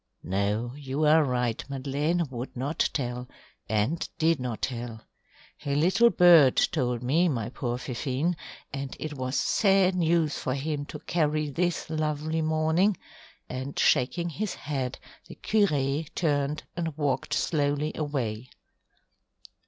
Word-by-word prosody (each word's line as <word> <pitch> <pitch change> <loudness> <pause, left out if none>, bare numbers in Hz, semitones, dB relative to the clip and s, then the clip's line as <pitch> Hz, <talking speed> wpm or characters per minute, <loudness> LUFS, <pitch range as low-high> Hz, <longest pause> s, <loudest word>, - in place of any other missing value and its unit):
"No, 105 +5 -1
you 145 +1 -2
are 155 +1 +6
right, 125 -4 -1
Madeleine 145 +5 0
would 125 +1 -6
not 140 +6 0
tell, 125 -2 -3 0.4
and 110 +10 0
did 160 -1 +2
not 125 -3 -4
tell. 120 -3 -4 0.6
A 140 -1 -1
little 185 +10 +5
bird 170 - +7
told 125 -6 +1
me, 165 +8 +3
my 115 -6 -2
poor 120 -1 -3
Fifine, 135 +6 -2 0.4
and 135 -1 -5
it 155 -1 -4
was 130 -1 -3
sad 195 -3 +3
news 165 -3 +2
for 130 - -2
him 145 +1 -3
to - - -7
carry 155 -3 0
this 175 +4 -1
lovely 155 0 -1
morning," 160 +5 +2 0.5
and 130 +2 -5
shaking 155 +6 +2
his 195 +5 -3
head, 135 -3 -3 0.3
the - - -10
curé 150 -8 +1
turned 150 -2 0
and 165 -3 -3
walked 140 -4 0
slowly 145 -1 0
away. 130 -6 -3
145 Hz, 130 wpm, -27 LUFS, 130-160 Hz, 0.6 s, bird